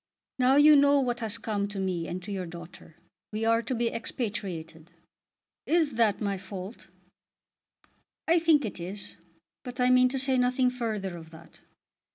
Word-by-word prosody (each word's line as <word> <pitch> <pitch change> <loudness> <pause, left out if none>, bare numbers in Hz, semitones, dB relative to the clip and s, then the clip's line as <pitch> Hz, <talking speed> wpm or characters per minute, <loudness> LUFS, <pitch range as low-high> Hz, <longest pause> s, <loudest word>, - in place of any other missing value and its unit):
"Now 255 +1 +4
you 295 +1 +8
know 285 0 +5
what 245 -2 -1
has 225 -2 -1
come 210 -3 -2
to 205 0 -8
me 185 -3 -2
and 180 +1 -5
to 205 - -7
your 185 -3 -4
daughter. 170 -1 -11 0.4
We 215 +1 -2
are 230 0 +3
to 255 +2 -3
be 235 0 -1
expatriated." 175 -9 -5 0.8
"Is 320 -3 +2
that 225 -3 +2
my 200 -3 -2
fault?" 190 +3 -8 1.4
"I 335 +1 +4
think 320 -5 +3
it 205 - -6
is, 190 +4 -6 0.5
but 250 +1 -8
I 250 0 +4
mean 255 0 +5
to 270 - -3
say 260 -1 +2
nothing 250 0 +2
further 215 -7 -3
of 160 -1 -12
that. 160 0 -16
225 Hz, 170 wpm, -28 LUFS, 190-255 Hz, 1.4 s, you